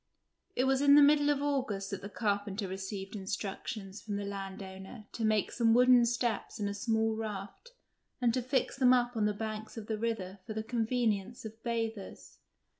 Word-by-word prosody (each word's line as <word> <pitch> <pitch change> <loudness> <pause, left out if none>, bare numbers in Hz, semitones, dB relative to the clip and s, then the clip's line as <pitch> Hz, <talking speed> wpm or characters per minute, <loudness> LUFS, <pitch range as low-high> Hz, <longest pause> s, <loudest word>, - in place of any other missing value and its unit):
It 250 - +2
was 265 0 +2
in 285 0 +7
the 295 - +9
middle 290 0 +5
of 285 -1 +1
August 250 -9 -1
that 195 - -4
the 200 - -7
carpenter 205 -1 -1
received 190 +2 -5
instructions 195 0 -5
from 210 -2 -4
the 200 0 -3
landowner 195 +1 -7
to 230 - -4
make 215 -1 +2
some 230 -1 +3
wooden 250 -1 +6
steps 235 -2 -1
and 205 - -1
a 200 - -2
small 220 +1 0
raft 215 - -6 0.5
and 240 -2 +2
to 255 - 0
fix 260 +1 0
them 255 -2 +5
up 245 -1 +2
on 215 -2 +1
the - - +1
banks 215 +1 -5
of 220 - -6
the 215 -1 -3
river 205 -4 -3
for 220 - -5
the 220 - -2
convenience 230 -1 -1
of 220 +1 -9
bathers. 225 -3 -4
220 Hz, 190 wpm, -32 LUFS, 200-245 Hz, 0.5 s, the